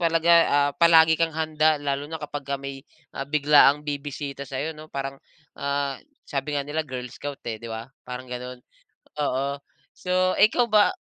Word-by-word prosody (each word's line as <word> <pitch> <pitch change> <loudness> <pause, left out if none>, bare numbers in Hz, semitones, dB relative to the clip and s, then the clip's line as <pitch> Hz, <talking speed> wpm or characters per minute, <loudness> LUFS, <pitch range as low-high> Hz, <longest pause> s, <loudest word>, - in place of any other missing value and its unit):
talaga, 165 0 +2 0.2
ah, 145 0 +3
palagi 160 -1 +6
kang 165 -2 0
handa 155 -1 +2
lalo 140 0 -2
na 160 - -4
kapagka 145 -1 -4
may 140 -1 -7 0.5
biglaang 145 -1 +5
bibisita 140 -1 -5
sa'yo, 140 +5 -3
'no? 155 0 -12
Parang, 135 -1 -5 0.4
ah, 140 0 -1 0.3
sabi 145 +1 -3
nga 140 - -1
nila 155 +2 -2
girl 125 -2 -5
scout 145 -1 -7
eh, 110 -1 -5
di 115 - -8
ba? 110 0 -5 0.2
Parang 125 0 -7
ganun. 125 0 -6 0.6
Oo. 140 0 -1 0.4
So, 185 0 +1
ikaw 230 +3 +5
ba 210 -1 +5
145 Hz, 160 wpm, -25 LUFS, 135-155 Hz, 0.6 s, palagi